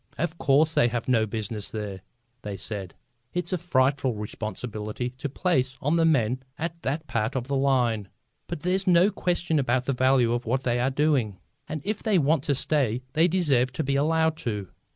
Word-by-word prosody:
"Of 170 +1 -2
course 150 +3 +3
they 120 - +4
have 120 0 -3
no 115 -4 +3
business 110 -1 -4
there," 105 -4 -5 0.4
they 100 -2 -5
said. 95 -2 -5 0.4
"It's 180 +1 -2
a - - +2
frightful 135 -6 +1
responsibility 110 +2 -5
to 145 - -3
place 135 -4 0
on 145 +4 +1
the 165 -1 +3
men 130 -5 +2 0.2
at 165 +1 -4
that 150 +4 -2
part 110 -3 -1
of 125 -2 -1
the 140 - -1
line. 125 -7 +1 0.4
But - - -5
there's 190 +2 0
no 180 +3 +5
question 175 -4 0
about 130 -1 +1
the 135 - 0
value 130 -2 +3
of 120 -1 -3
what 130 +3 0
they 120 -1 +1
are 125 +2 +2
doing, 135 -8 +1 0.3
and 155 -2 -4
if 215 +1 -2
they 215 -4 +2
want 155 -1 +3
to 145 - +2
stay 130 -4 0
they 160 +2 +4
deserve 145 -9 +2
to 160 - -2
be 140 0 0
allowed 160 +2 +2
to. 105 - -4
135 Hz, 195 wpm, -26 LUFS, 115-160 Hz, 0.4 s, no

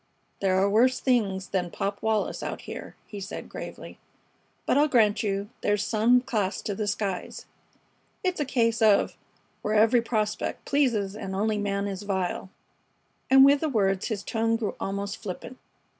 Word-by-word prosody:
"There 190 -1 +2
are 195 - +3
worse 240 +5 +3
things 200 -7 0
than 180 -2 -1
Pop 200 +3 -3
Wallis 220 -1 0
out - - -4
here," - - -8
he 205 - -8
said, 195 +1 -6
gravely. - - -9 0.7
"But - - +2
I'll 295 +2 +5
grant 220 -7 +3
you 200 0 -2
there's 205 0 +1
some 235 +3 +3
class 210 -6 -1
to 205 - -2
the 210 +1 -3
skies. 200 -2 -3 0.8
It's 365 -2 0
a 295 - +1
case 230 -3 +1
of 215 -2 +4 0.5
'Where 215 - -1
every 225 +3 +5
prospect 215 -2 -2
pleases 230 -9 +1
and 190 -3 -5
only 210 +1 0
man 200 -1 -1
is 195 -1 -4
vile.'" 190 -2 -2 0.8
And 270 0 +8
with 280 +1 +5
the 315 - -1
words 195 -6 +1
his 215 -4 -3
tone 225 0 0
grew 225 -3 -2
almost 200 +1 -3
flippant. 225 +5 -7
210 Hz, 165 wpm, -26 LUFS, 200-235 Hz, 0.8 s, And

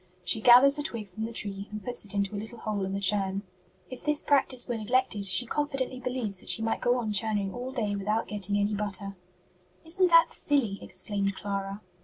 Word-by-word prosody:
She 180 +5 +2
gathers 260 +5 +7
a - - 0
twig 230 -9 -4
from 220 +4 -5
the 230 - -6
tree 200 -3 -3
and 210 0 -8
puts 245 -1 -1
it 205 - -4
into 200 0 -1
a - - -3
little 220 +2 -9
hole 210 -3 -3
in 190 - -4
the 195 - -2
churn. 195 0 0 0.5
If 255 - -8
this 300 0 0
practice 265 -3 +1
were 240 - -2
neglected, 225 -2 0
she 215 +6 +5
confidently 270 -1 -2
believes 245 -6 -4
that - - -5
she 225 - +6
might 225 - -1
go 245 +1 +2
on 220 -3 -2
churning 205 -2 +1
all 250 +1 -6
day 215 -6 -2
without 210 +3 -2
getting 205 -1 -1
any 205 +1 0
butter." 200 -1 -2 0.7
"Isn't 365 +3 +2
that 335 -1 +5
silly?" 245 -9 -1
exclaimed 200 -1 0
Clara. 195 0 -5
215 Hz, 210 wpm, -28 LUFS, 200-250 Hz, 0.7 s, gathers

